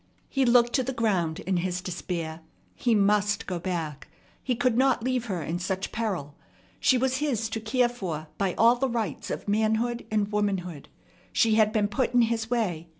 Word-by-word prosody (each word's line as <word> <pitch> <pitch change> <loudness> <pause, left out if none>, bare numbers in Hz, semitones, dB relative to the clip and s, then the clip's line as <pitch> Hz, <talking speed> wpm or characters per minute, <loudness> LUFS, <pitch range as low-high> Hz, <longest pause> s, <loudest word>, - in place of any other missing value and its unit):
He 270 -1 +1
looked 240 0 +4
to 260 - +2
the 265 +2 -3
ground 190 -9 0
in 190 -1 -1
his 180 0 -1
despair. 170 -3 -4 0.3
He 235 -2 +1
must 205 +1 +2
go 180 -2 -3
back. 165 -5 -4 0.3
He 255 - -1
could 245 0 +1
not 260 -2 +3
leave 255 -1 0
her 185 -8 -3
in 165 +4 -3
such 190 +1 -3
peril. 190 -11 -3 0.5
She 260 - +4
was 260 +1 +1
his 260 -7 0
to 225 - -3
care 240 +3 +2
for 180 -11 -5
by 195 -3 0
all 235 +2 +5
the 270 +1 0
rights 225 - -3
of - - -5
manhood 220 +3 0
and 210 -1 0
womanhood. 190 -7 -2 0.4
She 225 -2 +3
had 215 -1 +4
been 215 -2 +1
put 240 +4 -1
in 245 - +6
his 225 -1 -1
way. 185 -9 -1
215 Hz, 190 wpm, -27 LUFS, 185-240 Hz, 0.5 s, in